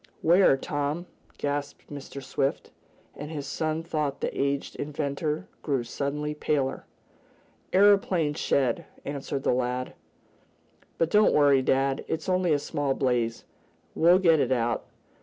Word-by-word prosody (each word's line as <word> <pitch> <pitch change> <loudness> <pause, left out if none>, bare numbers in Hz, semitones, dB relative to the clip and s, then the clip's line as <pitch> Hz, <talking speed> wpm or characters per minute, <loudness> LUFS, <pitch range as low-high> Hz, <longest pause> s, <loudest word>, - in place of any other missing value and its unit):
"Where, 170 -4 +5
Tom?" 145 +5 -3 0.3
gasped 145 0 -4
Mr. 140 -1 -8
Swift, 135 +1 -2 0.4
and 145 +1 -7
his 150 -3 -5
son 155 +3 -2
thought 150 -4 -2
the - - -3
aged 140 0 -1
inventor 150 +1 -3
grew 135 -5 -1
suddenly 145 +5 -3
paler. 145 -3 -1 0.9
"Aeroplane 190 -6 +4
shed," 130 -4 0 0.2
answered 140 -1 -4
the - - +2
lad. 125 0 -2 1.0
"But 165 0 +1
don't 210 0 +5
worry 140 -2 +5
dad. 135 +1 +1
It's 160 - -3
only 185 -2 +2
a 150 - +4
small 145 -2 -2
blaze. 120 -3 0 0.5
We'll 175 +3 +5
get 165 -4 +4
it 130 -2 +1
out. 120 -2 0
145 Hz, 130 wpm, -27 LUFS, 135-160 Hz, 1.0 s, Where